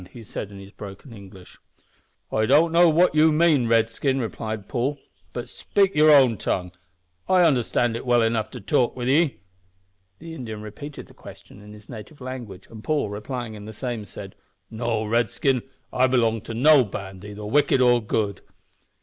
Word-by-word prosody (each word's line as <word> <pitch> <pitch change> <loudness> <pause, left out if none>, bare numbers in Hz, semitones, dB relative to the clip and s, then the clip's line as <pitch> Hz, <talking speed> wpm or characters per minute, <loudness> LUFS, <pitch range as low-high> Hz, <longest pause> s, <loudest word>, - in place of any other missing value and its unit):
he 120 - -10
said, 105 -1 -6
in 100 - -12
his 100 0 -12
broken 100 +5 -11
English. 95 -3 -14 0.7
"I 110 0 +1
don't 165 +6 +4
know 170 +1 +6
what 170 +3 +3
ye 155 +1 +5
mean, 155 -5 +3
Redskin," 115 +4 +1
replied 110 -3 -5
Paul; 130 +6 -1 0.3
"but - - -6
speak 195 -1 0
your 155 +1 +5
own 130 -6 +6
tongue, 90 -1 -2 0.6
I 185 -1 +5
understand 120 -5 +1
it 115 - -5
well 120 -2 +3
enough 115 -1 0
to 125 - -9
talk 120 +4 +1
with 125 -1 -4
ye." 150 +2 +3 0.8
The 165 +1 -10
Indian 110 -8 -7
repeated 135 +8 -9
the - - -19
question - - -14
in 105 0 -13
his 105 0 -15
native 115 +5 -10
language, 125 -7 -8
and 110 -1 -11
Paul, 150 -8 0
replying 115 +2 -5
in 105 -1 -10
the 110 - -8
same, 120 -1 -4
said 100 -2 -10 0.4
"No, 110 -1 -2
Redskin, 120 +3 +1 0.3
I 130 +1 +3
belong 115 -4 +1
to 115 - -6
no 145 +3 +6
band, 95 -2 -8
either 105 0 -8
wicked 135 +4 +2
or 120 -1 +4
good." 105 -2 -2
120 Hz, 175 wpm, -24 LUFS, 105-135 Hz, 0.8 s, know